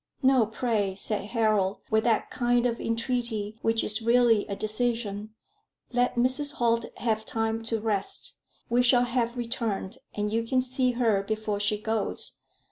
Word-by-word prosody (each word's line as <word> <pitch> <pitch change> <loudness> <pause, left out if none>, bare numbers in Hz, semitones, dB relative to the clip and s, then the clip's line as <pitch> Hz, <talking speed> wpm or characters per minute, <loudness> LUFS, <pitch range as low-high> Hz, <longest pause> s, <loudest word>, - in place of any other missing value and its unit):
"No, 260 -4 +5
pray," 215 -4 -1
said 200 +1 -3
Harold, 215 -3 +1
with 220 0 +3
that 230 -2 +1
kind 240 0 +2
of 235 -1 0
entreaty 230 -2 -2
which 225 0 +2
is 215 +2 +1
really 235 -2 +4
a 200 - -3
decision. 215 -1 -2 0.6
"Let 245 0 +1
Mrs. 260 +4 +1
Holt 230 -1 +1
have 220 -2 0
time 225 0 -1
to 225 0 +1
rest. 210 -3 -3 0.3
We 240 +1 +3
shall 245 0 +5
have 240 0 -1
returned, 230 -5 -3 0.2
and 210 0 -1
you 230 - +2
can 240 +3 +1
see 255 0 +1
her 225 -5 +2
before 215 0 -2
she 205 0 0
goes. 220 +1 -2
225 Hz, 155 wpm, -27 LUFS, 215-245 Hz, 0.6 s, No